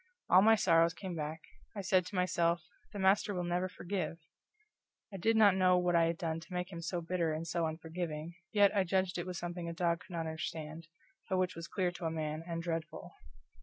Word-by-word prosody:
All 185 - +8
my 225 +2 +7
sorrows 165 -4 +4
came 190 -3 -6
back. 155 +1 -4 0.3
I 200 - -3
said 185 -1 +2
to 200 - -8
myself, 170 -1 +1 0.3
the 210 - -7
master 195 +1 +3
will 180 - -1
never 175 +1 -1
forgive. 180 -2 -3 1.0
I - - -4
did 220 +5 +2
not 205 -3 +6
know 185 -1 +4
what 180 -1 +2
I 165 0 +5
had 165 0 0
done 165 -1 -2
to 170 - -12
make 180 +1 -3
him 170 -2 -6
so 170 +1 -2
bitter 170 -1 0
and 160 +2 -3
so 170 0 0
unforgiving, 160 0 -5 0.2
yet 205 -1 +4
I 195 - +4
judged 185 0 0
it 175 - -4
was 180 -1 -4
something 175 0 -4
a - - -4
dog 170 -1 +1
could - - -13
not 165 - -1
understand, 160 0 -5 0.4
but 190 - +1
which 185 0 0
was 165 0 -7
clear 185 -3 0
to 175 -1 -7
a - - +1
man 155 0 -3
and 170 -1 -3
dreadful. 165 -1 -4
175 Hz, 220 wpm, -33 LUFS, 165-185 Hz, 1.0 s, All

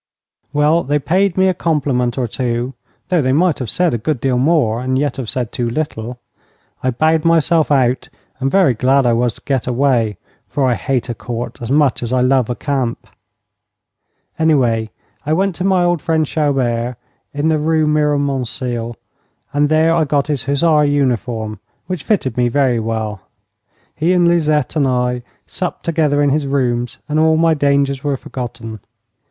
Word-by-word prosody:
Well, 150 +3 +3
they 145 -1 0
paid 185 +6 +1
me 190 0 +4
a 185 - +2
compliment 140 -8 0
or 125 -2 0
two, 120 +2 -2 0.4
though 180 -3 +2
they 130 -1 +1
might 170 +2 +2
have 125 -4 -4
said 175 +1 +1
a 120 - -1
good 140 +4 -1
deal 125 0 0
more 130 -6 +2
and 130 +1 0
yet 145 +1 -1
have 125 -5 -4
said 125 -4 -2
too 120 -1 -2
little. 120 -3 -4 0.6
I 130 - 0
bowed 155 +5 +1
myself 165 -1 +3
out, 130 -3 +1 0.3
and 135 - 0
very 185 -6 +4
glad 130 +3 +2
I 120 - +3
was 120 -1 0
to - - -18
get 135 -4 -1
away, 120 -5 +1 0.3
for 140 - 0
I 125 - +3
hate 125 +1 -2
a - - -1
Court 120 +2 -6
as 120 - -5
much 145 -1 +2
as 120 -1 -3
I 130 -1 +2
love 125 -2 +2
a 120 - -1
camp. 130 -4 -2 1.3
Away 125 -9 +2 0.3
I 155 +1 0
went 190 +3 +1
to 180 - -3
my 190 -2 +3
old 175 -3 +1
friend 160 -1 +1
Chaubert, 125 -6 -1 0.3
in 145 +2 0
the 155 -1 +2
Rue 155 +1 +1
Miromesnil, 135 -5 -1 0.6
and 145 0 +2
there 160 +1 +3
I 165 -1 +3
got 140 -1 +1
his 145 -4 -2
hussar 150 +2 +3
uniform, 120 -7 -1 0.3
which 185 -4 -4
fitted 175 - 0
me 125 0 +3
very 130 -2 +1
well. 110 -3 -3 0.7
He 165 +4 +1
and 175 -1 +3
Lisette 155 -4 +1
and 145 -3 +2
I 125 -1 0 0.2
supped 180 -2 -5
together 150 -3 +1
in 140 - +2
his 145 0 0
rooms, 125 -3 -1
and 155 +1 0
all 160 0 +4
my 165 0 +3
dangers 140 -2 +1
were 145 -2 0
forgotten. 115 -4 -7
140 Hz, 180 wpm, -17 LUFS, 125-155 Hz, 1.3 s, me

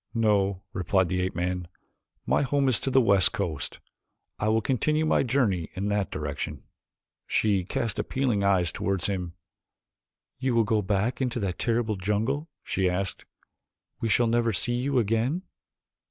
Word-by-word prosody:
"No," 100 -4 +2
replied 95 0 +1
the 90 +1 0
ape 95 0 -2
man. 90 0 -2 0.6
"My - - +2
home 140 0 +1
is 125 -5 +4
upon 135 - -2
the 130 - +6
west 100 -5 +5
coast. 85 -7 -3 0.6
I 105 - 0
will 110 +1 +3
continue 150 +7 +1
my - - +3
journey 115 - +1
in 100 +2 -2
that 105 -1 0
direction." 75 -1 -4 0.6
She 100 -4 +1
cast 115 +4 -2
appealing 125 -7 0
eyes 95 -5 +3
toward 95 -3 -1
him. 90 -4 -2 1.1
"You 130 -2 0
will 115 - +4
go 110 0 +1
back 105 +6 -1
into 125 -2 -1
that 95 -3 -3
terrible 115 -3 0
jungle?" 110 - -1
she 95 -1 0
asked. 90 +1 -3 0.7
"We 115 - -1
shall 120 +3 +4
never 115 0 +2
see 120 +5 0
you 130 +3 0
again?" 120 - +1
105 Hz, 155 wpm, -27 LUFS, 95-120 Hz, 1.1 s, the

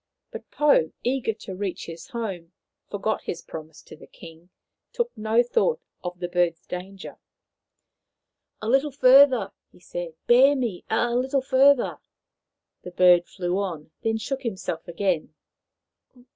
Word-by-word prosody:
But - - -9
Pou, 290 - +3
eager 250 -2 0
to 210 -3 -9
reach 190 -1 -4
his 165 0 -9
home, 190 -8 -6 0.4
forgot 210 +2 -2
his 170 - -6
promise 160 -1 -10
to - - -13
the 155 - -15
king, 165 +1 -14 0.4
took 480 -1 -2
no 220 +2 +2
thought 460 - +1 0.2
of 180 0 -6
the 175 - -3
bird's 175 -2 0
danger. 185 +2 -8 0.7
" - - -57
A - - -3
little 270 +5 +3
fur 270 +1 +7
ther! 230 -8 -3
" - - -59
he - - -21
said. 175 -2 -7
" - - -57
Bear 265 +4 +6
me 235 -9 -3
a 235 +2 +1
little 260 +2 0
further! 270 0 +3 0.4
" - - -62
The - - -7
bird 180 -1 +5
flew 180 0 -2
on, 165 -6 -5
then 225 0 0
shook 260 +5 -4
himself 185 -8 -5
again. 170 -3 -2
200 Hz, 160 wpm, -25 LUFS, 175-255 Hz, 0.7 s, fur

